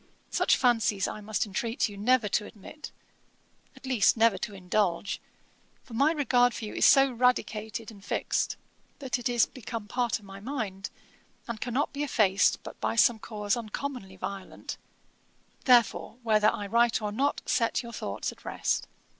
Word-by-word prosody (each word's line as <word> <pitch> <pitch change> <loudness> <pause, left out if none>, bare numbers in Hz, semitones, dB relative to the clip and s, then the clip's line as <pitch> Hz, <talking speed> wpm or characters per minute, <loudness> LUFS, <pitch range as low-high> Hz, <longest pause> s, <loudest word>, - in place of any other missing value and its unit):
Such - - +3
fancies 225 -5 +2
I 215 - -6
must 215 +3 -1
entreat 225 +5 -1
you 205 - -9
never 230 +2 +2
to 210 +1 0
admit, 260 +9 -11 0.8
at - - -13
least 250 -4 +3
never 225 -4 +4
to 205 - -5
indulge: 190 +1 -1 0.6
for 235 - -14
my 280 +7 +3
regard 245 -5 +3
for 225 - -5
you 210 - -7
is - - +4
so 270 -1 +6
radicated 230 -2 0
and 200 -2 -15
fixed, - - -1 0.4
that 260 -3 -2
it 245 - -1
is 240 -1 +4
become 230 -3 -7
part 245 +1 0
of 210 - -17
my 195 0 -10
mind, 205 -5 -4 0.6
and 235 -3 -5
cannot 250 +4 -1
be 285 - -4
effaced 210 -9 +2
but - - -10
by - - 0
some 230 0 +4
cause 210 -1 -2
uncommonly 235 -3 -5
violent; 190 0 -6 0.9
therefore, 240 -2 +3
whether 215 -2 +4
I 205 - -4
write 235 +3 +3
or 210 -1 -3
not, 275 +7 0
set 245 0 +1
your 235 0 -9
thoughts - - -3
at - - -17
rest. - - -1
225 Hz, 165 wpm, -28 LUFS, 205-250 Hz, 0.9 s, so